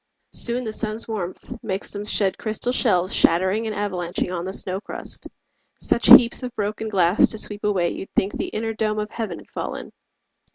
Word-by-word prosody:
Soon 245 +1 +1
the 220 -2 -4
sun's 215 0 -2
warmth 195 -5 -6
makes 195 -1 -4
them 205 0 -5
shed 195 -2 +1
crystal 220 +2 -2
shells 185 -8 +2
Shattering 190 +6 +3
and 215 - -4
avalanching 185 -3 -3
on 170 0 -4
the 190 - -4
snow 190 0 -1
crust - - -7 0.5
Such 235 - +1
heaps 235 -1 +8
of 250 -1 -6
broken 215 +1 -3
glass 185 -1 +4
to 220 - +1
sweep 210 -1 -3
away 190 -5 +1
You'd 195 - -7
think 195 +2 +1
the - - -3
inner 225 +1 -3
dome 215 -1 -1
of 210 0 -3
heaven 210 -8 -4
had - - -16
fallen. - - -6
210 Hz, 190 wpm, -22 LUFS, 190-220 Hz, 0.5 s, heaps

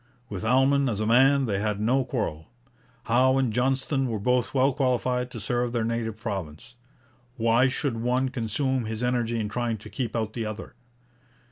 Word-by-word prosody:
With 100 -3 -5
Almon 135 +3 +3
as 105 -3 -2
a 110 - 0
man 135 +4 +4
they 100 -4 -1
had 105 -1 -1
no 125 +5 +2
quarrel. 105 - -3 0.6
Howe 130 +3 +3
and 130 -5 +1
Johnston 135 +2 +1
were 115 -2 -2
both 125 +4 +1
well 135 0 +2
qualified 125 -2 0
to 120 - -8
serve 120 +2 -1
their 115 -2 0
native 115 -2 -2
province. 100 -1 -6 0.6
Why 115 +2 +3
should 130 -1 -2
one 125 +3 0
consume 125 +2 -1
his 110 +2 -4
energy 120 -2 0
in 105 - -1
trying 115 +1 -2
to 105 - -12
keep 120 -4 -3
out 110 -1 -2
the 115 - -3
other? 110 0 -6
120 Hz, 175 wpm, -26 LUFS, 110-130 Hz, 0.6 s, man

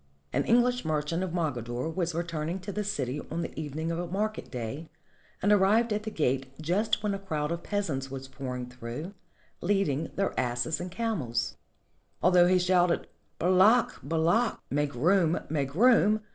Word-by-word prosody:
An - - +2
English 245 +1 +3
merchant 155 +2 -1
of 185 - -1
Mogador 125 -7 -2
was 175 -3 -1
returning 170 0 -2
to 200 +2 -5
the 210 +2 -2
city 145 -8 -2
on 170 +2 -2
the - - -6
evening 155 +2 -3
of 165 - -2
a 175 - -3
market 210 +5 -2
day, 130 +6 -5 0.5
and 205 - +4
arrived 210 +3 +4
at 210 - -1
the 215 - -4
gate 135 -8 -1
just 205 +7 0
when 210 -1 0
a 195 - -3
crowd 155 -5 -2
of 170 0 -2
peasants 155 -11 -2
were 135 0 -5
pouring 130 -2 -6
through, 125 +8 -7 0.5
leading 170 -6 +1
their 195 0 0
asses 120 +6 -1
and 180 - -4
camels. 175 - -2 0.7
Although 180 0 +6
he 185 +1 +4
shouted 180 -1 +2 0.3
"Bal 185 +2 +3
ak! 225 +4 +4
Bal 160 0 0
ak!" 230 +6 +2
(Make 145 -1 0
room! 170 +4 +3
Make 140 -2 -1
room!) 215 -1 +5
170 Hz, 175 wpm, -29 LUFS, 145-200 Hz, 0.7 s, Although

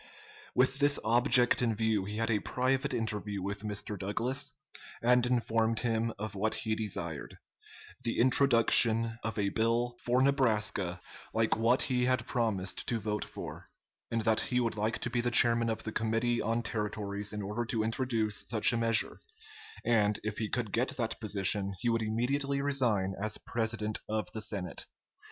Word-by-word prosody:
With 130 +2 +3
this 145 0 +3
object 120 +2 +5
in 115 -3 +1
view, 110 -3 0
he 105 +1 -5
had 115 +1 0
a 105 - +2
private 130 +5 0
interview 105 -4 -2
with 100 +1 -4
Mr. 105 -1 -4
Douglas, 130 +8 0 0.5
and 125 +1 +3
informed 115 -2 +1
him 115 -1 0
of 110 +1 -5
what 105 +2 -1
he 110 - 0
desired 95 -8 -4 0.7
the 115 - -1
introduction 115 -3 +4
of 110 0 -4
a 100 -1 +1
bill 115 +3 0
for 125 +2 +2
Nebraska 110 -9 +1 0.4
like 115 0 +2
what 115 +3 +2
he 125 -2 0
had 130 -2 +1
promised 110 -8 -2
to 115 - 0
vote 105 0 -2
for, - - -9 0.4
and 115 -1 -1
that 110 -1 +2
he 125 -2 0
would 115 -2 -1
like 110 +2 -1
to 125 - -3
be 120 -1 0
the 120 - 0
chairman 115 -1 +3
of 110 - -3
the 110 - -4
Committee 115 +2 0
on 115 +2 -1
Territories 105 -1 -3
in 105 -1 -5
order 105 +4 -3
to 110 -1 -1
introduce 115 -2 -1
such 110 +1 +4
a - - 0
measure; 115 -1 +1 0.7
and, 105 -2 +2
if 105 0 -4
he 110 -2 -2
could 115 -2 -2
get 130 +4 -1
that 115 -2 -2
position, 100 -2 +1
he 120 - 0
would 115 0 +1
immediately 135 +6 -1
resign 120 -9 +1
as 105 0 -1
president 110 -2 -1
of 110 0 -2
the 110 - -5
Senate. 100 -4 -3
115 Hz, 170 wpm, -31 LUFS, 105-120 Hz, 0.7 s, object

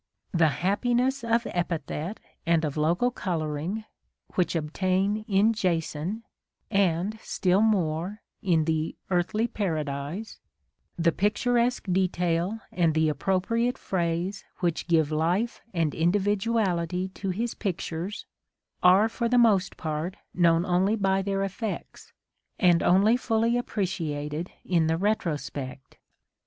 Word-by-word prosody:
"The 165 -2 +4 0.2
happiness 245 +6 +1
of 230 0 +1
epithet 170 +2 -3 0.2
and 165 -1 +2
of 145 - -3
local 170 +11 +2
colouring" 170 - -3 0.5
which 180 -1 +1
obtain 185 +6 0
in 205 +3 +4
Jason, 180 +1 -1 0.5
and, 195 +1 +1
still 185 +1 +1
more, 190 -2 0 0.2
in 165 -4 +2
the 160 0 -1 0.2
Earthly 185 +5 +1
Paradise 160 0 -3 0.6
^ - - 0
*'the 170 - +5
pictu 210 +7 0
resque 240 +1 +2
detail 180 +2 0
and 165 -3 +2
the 160 0 +3
appropriate 200 +9 0
phrase 175 +1 -2
which 170 -2 -1
give 160 -3 +3
life 175 +9 0
and 165 -5 0
individuality 190 -1 +1
to 195 +1 -5
his 225 +6 -1
pictures, 185 0 -4 0.6
are 190 +4 +6
for 235 +1 -2
the 245 - +3
most 205 -5 +3
part 160 +3 -3 0.2
known 170 -1 +3
only 190 +3 +2
by 195 -2 +1
their 195 0 -1
effects, 195 +2 -5 0.5
and 175 -3 +4
only 200 +6 +5
fully 230 -1 +1
appreciated 165 -8 -2 0.2
in 170 -3 +2
the 160 0 +1
retrospect." 150 -9 -3
185 Hz, 120 wpm, -27 LUFS, 165-210 Hz, 0.6 s, are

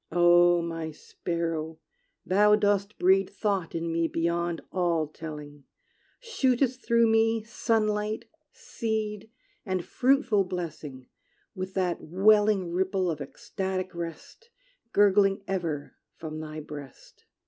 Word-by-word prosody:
Oh, 175 0 +5
my 165 -1 -4
sparrow, 160 0 -4 0.5
thou 210 +4 +5
dost 205 -1 0
breed 190 +1 +3
Thought 200 -5 -2
in 165 0 -2
me 165 0 +1
beyond 170 +1 -1
all 170 -4 +1
telling; 150 -2 -9 0.5
Shootest 260 - 0
through 235 0 +4
me 225 0 +3
sunlight, 215 -1 -1 0.3
seed, 220 -2 -4 0.3
And 185 -4 -2
fruitful 250 -6 +2
blessing, 155 -7 -6 0.5
with 185 0 -6
that 180 -2 0
welling 200 +1 +3
Ripple 185 0 0
of 150 -2 -5
ecstatic 185 +6 -4
rest, 170 - -8 0.4
Gurgling 200 -1 +4
ever 170 -7 -3 0.2
from 155 -1 -7
thy 155 0 -6
breast! 145 -3 -11
185 Hz, 110 wpm, -27 LUFS, 165-210 Hz, 0.5 s, Oh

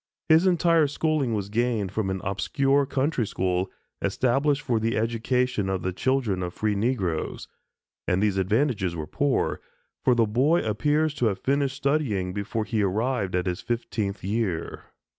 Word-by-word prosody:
His 160 +4 +6
entire 170 -3 +4
schooling 145 -5 0
was 100 -1 -3
gained 110 -3 0
from 105 -1 -1
an 95 -1 -3
obscure 135 +8 +1
country 135 -4 0
school, 95 0 -1 0.3
established 140 +3 +1
for 120 -6 +1
the 115 +2 0
education 115 -1 0
of 95 -1 -2
the 95 - -1
children 120 -4 0
of 90 -1 -4
free 110 -1 0
negroes; 100 -7 -1 0.6
and 90 - +2
these 100 -2 +1
advantages 100 - +1
were 80 -2 -4
poor, 140 - 0 0.4
for 125 - +4
the 115 -1 +4
boy 135 +10 +2
appears 145 +8 +1
to 125 -5 +1
have 100 -3 0
finished 140 +2 0
studying 135 -11 0
before 105 +2 -2
he 110 -1 0
arrived 100 0 0
at 90 - 0
his 90 +1 -2
fifteenth 110 -4 -3
year. 95 -4 -2
115 Hz, 160 wpm, -26 LUFS, 95-135 Hz, 0.6 s, His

